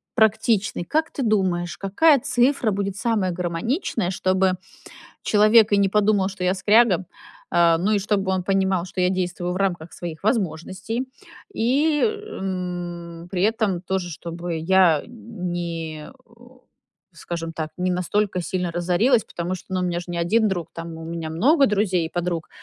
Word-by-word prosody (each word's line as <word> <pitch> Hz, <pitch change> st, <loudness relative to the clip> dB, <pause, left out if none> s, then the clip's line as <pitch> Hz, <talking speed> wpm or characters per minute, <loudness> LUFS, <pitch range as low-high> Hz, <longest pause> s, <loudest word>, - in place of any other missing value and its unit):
практичный, 220 Hz, -3 st, +2 dB
как 315 Hz, -, 0 dB
ты -, -, -5 dB
думаешь, 190 Hz, -7 st, 0 dB
какая 280 Hz, +11 st, +4 dB
цифра 245 Hz, -1 st, +1 dB
будет 200 Hz, -1 st, -2 dB
самая 205 Hz, -3 st, 0 dB
гармоничная, 180 Hz, -, -2 dB
чтобы 185 Hz, 0 st, +1 dB, 0.7 s
человек 215 Hz, +1 st, +5 dB
и -, -, +5 dB
не 200 Hz, -1 st, +4 dB
подумал, 205 Hz, -1 st, +2 dB
что 190 Hz, -2 st, -6 dB
я 180 Hz, +1 st, +2 dB
скряга, 205 Hz, -1 st, +4 dB, 0.5 s
а, 170 Hz, -1 st, +4 dB
ну 190 Hz, +6 st, 0 dB
и 210 Hz, -, +3 dB
чтобы 195 Hz, -1 st, 0 dB
он 185 Hz, -1 st, 0 dB
понимал, 190 Hz, -2 st, +1 dB
что 185 Hz, 0 st, -4 dB
я 180 Hz, -, +3 dB
действую 180 Hz, -1 st, -2 dB
в -, -, -3 dB
рамках 175 Hz, -4 st, -2 dB
своих 170 Hz, -1 st, -7 dB
возможностей, 210 Hz, -, -2 dB, 0.5 s
и, 290 Hz, +5 st, +2 dB
м, 180 Hz, -, -4 dB
при 185 Hz, -1 st, -1 dB
этом 210 Hz, -4 st, +1 dB
тоже 185 Hz, -1 st, -2 dB
чтобы 170 Hz, +1 st, -5 dB
я 170 Hz, -2 st, +4 dB
не, 175 Hz, -9 st, -5 dB
э, -, -, -13 dB, 1.0 s
скажем 165 Hz, -1 st, -5 dB
так, 155 Hz, -1 st, -4 dB
не 180 Hz, 0 st, 0 dB
настолько 185 Hz, +1 st, 0 dB
сильно 180 Hz, 0 st, -2 dB
разорилась, 180 Hz, +8 st, +2 dB
потому 175 Hz, +1 st, -4 dB
что 185 Hz, +1 st, -10 dB
ну, 185 Hz, -, 0 dB
у -, -, 0 dB
меня 175 Hz, -1 st, -1 dB
же 175 Hz, -, -8 dB
не 175 Hz, -1 st, -4 dB
1 215 Hz, +7 st, +2 dB
друг, 175 Hz, -4 st, -3 dB
там 165 Hz, 0 st, -7 dB
у 165 Hz, -, -8 dB
меня 165 Hz, -1 st, -5 dB
много 275 Hz, -, +4 dB
друзей 195 Hz, -4 st, +1 dB
и -, -, -16 dB
подруг, 175 Hz, -1 st, -3 dB
185 Hz, 160 wpm, -23 LUFS, 175-215 Hz, 1.0 s, человек